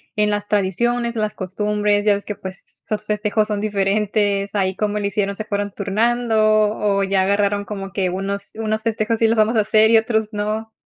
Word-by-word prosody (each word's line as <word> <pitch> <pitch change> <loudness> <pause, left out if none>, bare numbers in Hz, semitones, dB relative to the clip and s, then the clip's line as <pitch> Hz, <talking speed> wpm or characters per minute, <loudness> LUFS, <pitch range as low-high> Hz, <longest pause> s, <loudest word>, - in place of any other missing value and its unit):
en 210 0 +2
las 205 0 -2
tradiciones, 235 +5 0
las 215 -1 -1
costumbres, 205 +2 -1
ya 210 - +5
ves 200 0 -3
que, 210 - -4
pues, 190 -1 -10
sus 215 0 -3
festejos 210 0 0
son 210 -1 -2
diferentes, 205 0 0
¿ahí 190 -2 0
cómo 210 +1 -1
lo 205 - -3
hicieron, 200 0 -1
se 215 +2 -5
fueron 205 -1 -2
turnando 225 +4 0 0.4
o 200 -1 +1
ya 195 -1 +1
agarraron 200 +1 +1
como 195 -2 -6
que 190 -2 0
unos 200 +2 -4
unos 220 0 -2
festejos 225 0 0
sí 225 - +4
los 225 0 +1
vamos 220 +2 +3
a 220 - +4
hacer 215 +1 +4
y 225 - +6
otros 220 -1 0
no? 215 +1 -3
210 Hz, 200 wpm, -20 LUFS, 200-215 Hz, 0.4 s, y